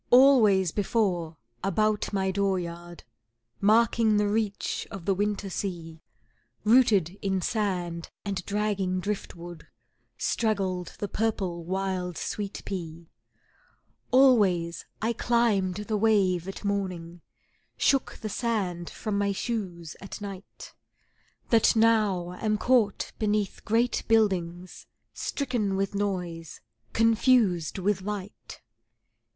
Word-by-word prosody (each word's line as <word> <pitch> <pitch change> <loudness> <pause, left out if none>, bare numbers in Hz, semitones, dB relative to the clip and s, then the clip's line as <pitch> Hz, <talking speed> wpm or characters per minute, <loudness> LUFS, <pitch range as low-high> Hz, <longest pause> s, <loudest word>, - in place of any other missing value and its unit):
Always 225 - +6
before 185 -6 -1 0.3
about 210 +2 +1
my 190 -2 0
dooryard, 175 -3 -3 0.6
Marking 220 +1 +4
the 210 0 +2
reach 210 -1 -1
of 190 -4 -8
the 195 - +2
winter 205 +1 -1
sea, 170 -4 -5 0.6
Rooted 210 -6 +4
in 190 -1 0
sand 180 -5 -2 0.2
and 195 -3 -3
dragging 200 -3 0
drift 205 +1 -4
wood, 175 -1 -10 0.5
Straggled 195 -5 -1
the 205 - -3
purple 195 -6 -2
wild 185 -1 -2
sweet 205 -1 -4
pea; 170 -3 -6 1.0
Always 200 -11 +3 0.2
I 230 +2 +1
climbed 225 -6 +1
the 210 +1 -2
wave 195 -5 +2
at 195 +2 -7
morning, 180 -4 -3 0.6
Shook 275 -1 +1
the 220 - -3
sand 195 -7 -2
from 210 -2 -3
my 200 0 +1
shoes 190 -7 -4
at 195 - -8
night, 200 -2 -9 0.8
That 230 0 +5
now 215 -6 +3
am 215 -1 +1
caught 230 -3 +2
beneath 210 -2 -1
great 230 +2 +1
buildings, 185 -5 0 0.3
Stricken 240 -8 -2
with 195 +1 -1
noise, 180 -5 -3 0.3
confused 225 - +3
with 190 0 0
light. 205 0 -7
200 Hz, 110 wpm, -27 LUFS, 180-215 Hz, 1.0 s, Always